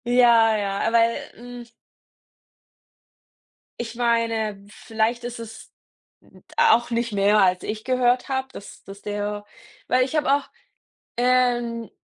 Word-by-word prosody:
Ja, 235 -2 +5
ja, 200 +1 -1
weil, 230 0 +3 0.2
hm 245 +1 -10 2.1
ich 230 -1 -5
meine, 230 -4 -1
vielleicht 225 +3 -2
ist 240 0 -6
es 225 -1 -11 0.5
'n - - -21
d - - -17
auch 235 +2 +4
nicht 235 -1 -1
mehr, 205 +1 +3
als 185 -1 +2
ich 215 0 -5
gehört 250 0 +1
habe, 265 0 -2
dass 200 - -12
dass 195 +1 -12
der 205 0 -4 0.4
weil 255 0 +3
ich 275 - -6
habe 295 -3 +1
auch, 285 0 -1 0.7
ähm 240 -2 +1
230 Hz, 130 wpm, -23 LUFS, 215-245 Hz, 2.1 s, Ja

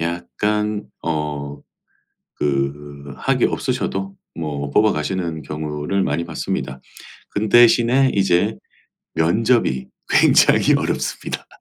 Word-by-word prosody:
약간 105 +5 -2 0.2
어 75 -3 -3 0.8
그 70 0 -2
학위 - - 0
없으셔도 95 0 -2 0.2
뭐 75 -3 -4
뽑아가시는 85 -4 0
경우를 75 +5 -3
많이 75 +4 -1
봤습니다. 65 -5 -4 0.5
그런데 110 +3 +3
대신에 120 +3 +5
이제 95 +2 +2 0.6
면접이 85 - +1 0.2
굉장히 - - +5
어렵습니다. - - -2
85 Hz, 225 characters per minute, -20 LUFS, 75-105 Hz, 0.8 s, 대신에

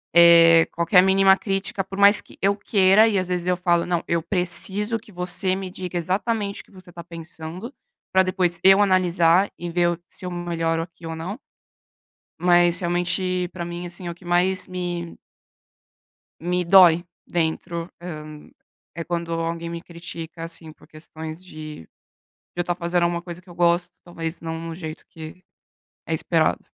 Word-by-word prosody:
Eh, 170 -1 +8
qualquer 170 +2 +4
mínima 190 0 +5
crítica, 195 -1 -2
por 195 +1 -9
mais 205 +1 +6
que - - -18
eu 200 +1 +2
queira, 200 +1 +4
e 200 -3 +1
às 185 - -3
vezes 180 -1 -2
eu 180 -1 +1
falo: 175 -1 +1
"Não, 175 -2 0
eu 170 -1 0
preciso 195 +4 0
que 215 -1 -16
você 180 +1 -1
me 190 -1 -5
diga 180 -1 -5
exatamente 200 +4 -2
o - - -23
que - - -26
você 185 -2 -15
tá 170 0 -9
pensando, 170 - -8 0.4
pra 190 0 +4
depois 180 -2 0
eu 195 +1 +7
analisar 185 -1 +3
e 175 0 -5
ver 175 0 +2
o 175 0 -3
se - - -11
eu 180 - -4
melhoro 165 -2 -2
aqui 165 0 -10
ou 165 0 -5
não". 180 +8 -5 1.0
Mas 175 0 +4
realmente 180 +1 0
pra 175 -2 -5
mim, 175 +1 -6
assim, 175 +1 -7
é 170 - -3
o - - -6
que 175 +1 -20
mais 180 +2 +1
me 175 -2 -5 1.2
me 180 +2 -1
dói 175 -2 +6 0.2
dentro, 170 0 -2
hã, 155 -4 -7 0.7
é 170 - -4
quando 170 0 -3
alguém 165 0 -3
me 170 - -5
critica, 170 -1 -9
assim, 165 -1 -7
por - - -21
questões 160 +1 -9
de 155 - -10 0.7
de 175 - -1
eu - - +3
estar 175 0 -2
fazendo 175 0 -1
alguma 170 0 0
coisa 175 0 -9
que 185 - -18
eu - - -11
gosto, 175 +1 +2
talvez 165 -1 -6
não 165 0 -5
no 165 0 -6
jeito 160 -2 -8
que 160 +3 -11 0.6
é - - -3
esperado. - - 0
175 Hz, 175 wpm, -23 LUFS, 170-185 Hz, 1.2 s, Eh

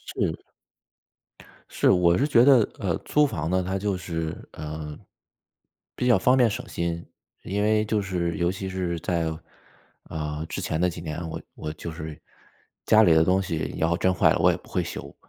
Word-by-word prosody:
是。 - - 0 1.3
是， - - +2
我 90 -2 +4
是 140 - +2
觉 120 -3 +5
得， 130 -6 +6
呃， 90 -6 -1
租 150 0 +2
房 80 - -3
呢 95 0 +1
它 95 +1 -1
就 100 -1 -1
是， 80 -3 -5
呃， 75 -1 -7 1.0
比 125 - -1
较 120 - +6
方 125 +7 +3
便 120 -3 +5
省 - - -5
心。 85 0 -3 0.4
因 100 +2 -2
为 110 +1 +2
就 105 -1 0
是 90 -3 -2
尤 85 +1 +1
其 95 0 -5
是 90 -2 -2
在， 85 -3 -1 0.7
啊， 75 -1 -4
之 - - -4
前 80 +2 -2
的 90 - +3
几 85 - -7
年， 80 +1 -5
我 80 - -5 0.2
我 75 - -5
就 80 +2 -7
是 80 -1 -7 0.7
家 110 0 +7
里 85 -5 +6
的 80 0 +5
东 95 +2 +3
西 85 -5 -3
然 80 - +2
后 85 - +1
真 95 - +2
坏 - - +4
了， - - -1
我 - - +5
也 - - -2
不 - - -20
会 - - 0
修。 - - -7
90 Hz, 210 characters per minute, -25 LUFS, 80-100 Hz, 1.3 s, 家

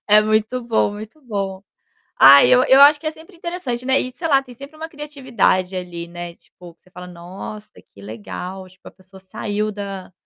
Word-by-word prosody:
É 210 +1 +7
muito 215 +3 0
bom, 225 -3 0
muito 215 +8 -10
bom. 195 -5 -4 0.5
Ah, 140 0 +8
eu 125 0 +5
eu 265 - +5
acho 290 +1 +8
que 310 - -5
é - - -1
sempre 325 +4 -17
interessante, 335 -8 -5
né, 265 +1 +2
e, 255 - -4
sei 330 +5 -4
lá, 275 -3 +3
tem 250 -2 -14
sempre 280 +5 -12
uma 320 +1 -6
criatividade 260 - -1
ali, 175 -2 -6
né, 175 0 -8
tipo 175 0 -17
que - - -40
você - - -24
fala: 180 0 -10
"Nossa, 185 +4 -10 0.2
que 100 - -15
legal!", 180 - -8
tipo 185 +1 -18
a - - -11
pessoa 190 +1 -18
saiu 205 +2 -4
da 195 -2 -7
205 Hz, 205 wpm, -20 LUFS, 180-265 Hz, 0.5 s, Ah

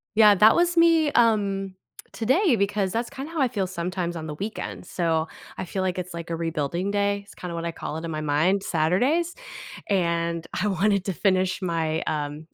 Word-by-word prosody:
Yeah, 210 -1 +7
that 215 +3 +6
was 345 0 +2
me, 330 -3 +5
um, 200 -6 +2 0.4
today 260 - +2
because 200 -2 0
that's 235 +1 -1
kinda 275 +3 -7
how 330 -3 -2
I 260 - +3
feel 195 -4 -1
sometimes 180 -1 -3
on 160 -1 -5
the 150 -1 -5
weekends, 105 - -6
so 165 -2 0 0.3
I - - -4
feel 190 +2 -3
like 185 -1 -1
it's, 180 0 -6
like, 170 0 -7
a 165 - -1
rebuilding 165 +3 -2
day, 200 0 0
it's - - -16
kinda 180 -1 -6
what 170 0 -4
I 170 - -3
call 155 - -5
it 160 - -5
in 165 - -4
my 155 - -3
mind, 155 +7 +1
Saturdays, 250 - +1 0.5
and 170 -3 0
I 205 - -1
wanted 200 0 +1
to 195 - -1
finish 185 0 +1
my, 165 -3 -1
um 150 +1 -4
185 Hz, 200 wpm, -25 LUFS, 165-210 Hz, 0.5 s, Yeah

